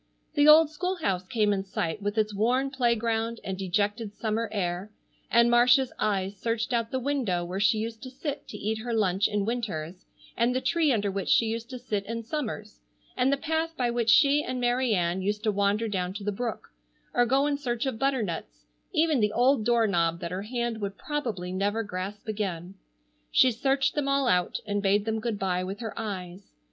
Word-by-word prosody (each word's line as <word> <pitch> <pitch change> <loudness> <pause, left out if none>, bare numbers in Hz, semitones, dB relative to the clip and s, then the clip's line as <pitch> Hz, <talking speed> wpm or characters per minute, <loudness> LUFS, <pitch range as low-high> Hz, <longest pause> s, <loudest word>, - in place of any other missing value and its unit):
The 290 -1 +4
old 305 0 +8
school 365 +4 -2
house 190 - -2
came 210 -1 +2
in 195 -1 -1
sight 190 0 -3
with 205 +2 -2
its 215 -1 +1
worn 250 +6 +1
playground 230 -2 0
and 190 - -3
dejected 205 +3 -1
summer 225 0 -2
air, 185 -1 -2 0.4
and 235 0 +5
Marcia's 245 +2 +4
eyes 200 -2 0
searched 230 +2 -2
out 230 -1 0
the 260 - -2
window 245 -10 -1
where 180 +2 -4
she 215 +2 +3
used 225 +1 -4
to 260 - -7
sit 275 +2 -5
to 210 - -8
eat 220 +2 -2
her 235 +1 -3
lunch 195 -2 +2
in 205 -1 -1
winters, 190 -8 -4 0.3
and 240 +2 +1
the - - +2
tree 320 +2 +2
under 205 -4 +1
which 195 0 -3
she 230 - +5
used 230 +2 -3
to 255 - -6
sit 210 -4 -3
in 230 +1 -4
summers, 220 -5 -5 0.4
and 255 +1 +2
the 280 - +2
path 320 +2 -2
by 245 -2 +1
which 235 -1 0
she 285 +6 +5
and 255 0 -3
Mary 245 -1 +2
Ann 175 +1 0
used 210 +2 -2
to 215 - +2
wander 205 +2 +1
down 185 -3 -2
to 205 - -6
the 210 - -1
brook, 230 +2 -4 0.4
or 245 0 +3
go 270 +3 +3
in 290 -1 +1
search 245 -3 -2
of 255 -5 -3
butternuts, 180 - -2 0.3
even 310 -3 +2
the 210 -1 +2
old 245 +1 +3
door 235 0 +3
knob 170 -4 +1
that 170 - -5
her 185 +1 -3
hand 235 0 -3
would 200 -1 -4
probably 230 -12 -3
never 205 +4 0
grasp 200 +2 -6
again. 190 -4 -3 0.6
She 255 - +5
searched 270 +3 +1
them 295 -2 -1
all 275 -1 +2
out 180 -6 +1
and 205 -1 -1
bade 200 +1 +2
them 220 0 -1
good 220 -1 -2
bye 185 -2 -1
with 195 +3 -5
her 225 -3 -5
eyes. 190 -3 -6
220 Hz, 205 wpm, -27 LUFS, 200-250 Hz, 0.6 s, old